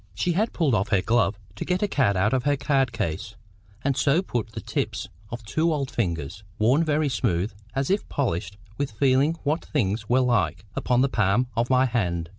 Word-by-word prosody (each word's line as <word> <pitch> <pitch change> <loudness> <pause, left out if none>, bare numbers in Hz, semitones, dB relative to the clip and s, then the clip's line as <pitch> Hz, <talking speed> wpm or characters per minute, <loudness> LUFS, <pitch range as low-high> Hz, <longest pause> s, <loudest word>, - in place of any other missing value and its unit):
She 175 - 0
had 210 +7 +1
pulled 155 -7 +1
off 100 -2 +1
her 100 -4 +2
glove 115 -3 +2 0.2
to - - -4
get 180 +2 0
a - - +2
card 120 - +2
out 105 +5 +2
of 130 -2 +1
her 145 -1 +2
card 135 -3 +1
case, 100 -9 -3 0.5
and 140 -1 +1
so 155 +8 +2
put 115 - -3
the 115 - -5
tips - - -3 0.2
of 120 0 -6
two 160 +9 +1
old 140 -4 -2
fingers, 85 - -2 0.2
worn 125 +9 +3
very 155 -1 +1
smooth, 95 -5 0 0.2
as 135 +5 0
if 200 - 0
polished 100 - -2 0.2
with 140 - 0
feeling 135 +7 +2
what 155 +3 0
things 105 -6 -1
were 130 +2 +4
like, 105 -8 +1
upon 125 -1 +1
the 135 - +4
palm 115 +1 +1
of 120 +1 0
my 130 0 +4
hand. 90 -9 -1
120 Hz, 205 wpm, -25 LUFS, 100-140 Hz, 0.5 s, were